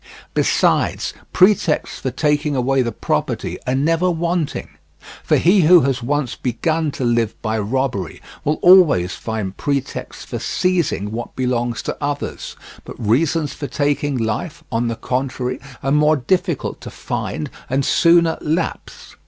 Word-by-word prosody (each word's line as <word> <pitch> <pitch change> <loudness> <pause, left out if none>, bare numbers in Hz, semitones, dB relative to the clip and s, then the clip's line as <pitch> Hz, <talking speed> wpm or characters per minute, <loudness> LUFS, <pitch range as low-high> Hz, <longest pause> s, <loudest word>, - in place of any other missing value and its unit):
Besides, - - +1 0.2
pretexts 185 -4 +2
for 130 - -2
taking 150 +2 0
away 130 +1 +2
the 120 -2 -1
property - - -2
are 125 - +1
never 165 +6 +2
wanting; 170 -2 -2 0.5
for - - +3
he 185 +3 +4
who 175 +1 +7
has 135 -2 0
once 140 +1 -1
begun 155 +6 -1
to - - -4
live 115 -2 0
by 110 0 -1
robbery 115 -4 -2 0.2
will 150 +1 0
always 160 - +6
find 110 -4 -4
pretexts 140 -2 -3
for - - -5
seizing 170 - 0
what 115 +2 -6
belongs 120 -2 -1
to - - -3
others; 145 0 -4 0.3
but - - -10
reasons 145 +7 +1
for 145 - -5
taking 145 -1 0
life, 115 +9 -3
on 120 0 0
the 115 - -2
contrary, 130 0 -2 0.2
are 135 - 0
more 150 +1 +4
difficult 175 +3 -1
to - - -7
find - - -4 0.2
and 135 +2 0
sooner 170 -1 +4
lapse. 160 +3 -3
140 Hz, 145 wpm, -20 LUFS, 120-160 Hz, 0.5 s, who